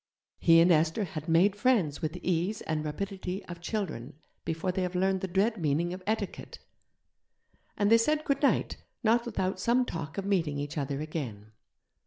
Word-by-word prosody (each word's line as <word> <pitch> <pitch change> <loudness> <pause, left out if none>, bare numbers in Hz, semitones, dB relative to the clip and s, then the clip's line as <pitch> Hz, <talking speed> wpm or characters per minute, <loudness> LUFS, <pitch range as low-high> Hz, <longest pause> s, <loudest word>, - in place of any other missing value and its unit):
He 165 -1 +6
and 175 +2 +5
Esther 160 +5 +3
had 165 -5 -6
'made 180 +5 +4
friends' 205 - +1
with 155 -1 -2
the - - -8
ease 180 +4 0
and 155 -1 -2
rapidity 190 +4 -4
of 175 -1 -9
children 175 - -4 0.3
before 165 +3 -1
they 190 +1 -2
have 180 0 -2
learned 190 +1 +1
the 190 - -2
dread 200 +5 +1
meaning 160 +3 0
of 185 - -7
'etiquette', 215 -2 -3 1.2
and 205 +1 +2
they 230 - +7
said 305 +6 +1
good 280 -1 0
night, 285 - +2 0.3
not 235 +2 +3
without 185 -4 -2
some 245 +5 +2
talk 165 -6 -6
of 195 - -2
meeting 170 -8 0
each 145 +1 -4
other 140 -1 -2
again. 120 -10 -5
180 Hz, 180 wpm, -29 LUFS, 155-205 Hz, 1.2 s, they